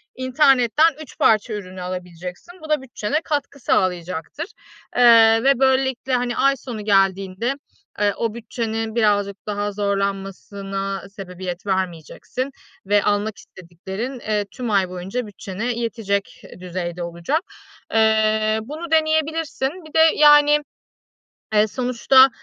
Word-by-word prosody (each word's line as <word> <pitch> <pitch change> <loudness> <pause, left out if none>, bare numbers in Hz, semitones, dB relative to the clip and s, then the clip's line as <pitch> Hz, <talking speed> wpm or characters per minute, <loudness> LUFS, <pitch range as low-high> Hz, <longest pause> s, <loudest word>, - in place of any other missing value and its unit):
internetten 265 +3 +3
3 300 - -12
parça 220 +1 +3
ürünü 185 -3 -7
alabileceksin. 180 - -7
Bu 315 - -10
da 300 -3 +2
bütçene 265 +3 -2
katkı 285 -2 -3
sağlayacaktır, 180 - -1 0.5
eee, 225 -2 +7
ve 275 -2 +4
böylelikle, 265 -1 +1
hani, 245 -1 0
ay 275 0 +3
sonu 230 -5 -7
geldiğinde, 195 +3 +1 0.5
eee, 205 -1 +2
o 230 -2 -1
bütçenin 225 -1 -4
birazcık 205 -3 +2
daha 205 0 -2
zorlanmasına 195 0 -3
sebebiyet 185 -2 -7
vermeyeceksin 190 - -3 0.4
ve 205 +1 +3
almak 205 0 0
istediklerin, 190 +8 -7
eee, 210 -2 -1
tüm 245 -3 -4
ay 195 -3 +2
boyunca 190 +7 -4
bütçene 205 +4 -4
yetecek 225 -4 -3 0.2
düzeyde 175 -1 -5
olacak. 170 - -2 0.5
Eee, 220 0 +3
bunu 310 +8 -7
deneyebilirsin. 315 -3 +1 0.2
Bir 310 - -14
de, - - +3 0.2
yani, 295 0 +7 1.0
eee, 210 +1 +4
sonuçta, 255 +3 +4
215 Hz, 120 wpm, -21 LUFS, 195-260 Hz, 1.0 s, eee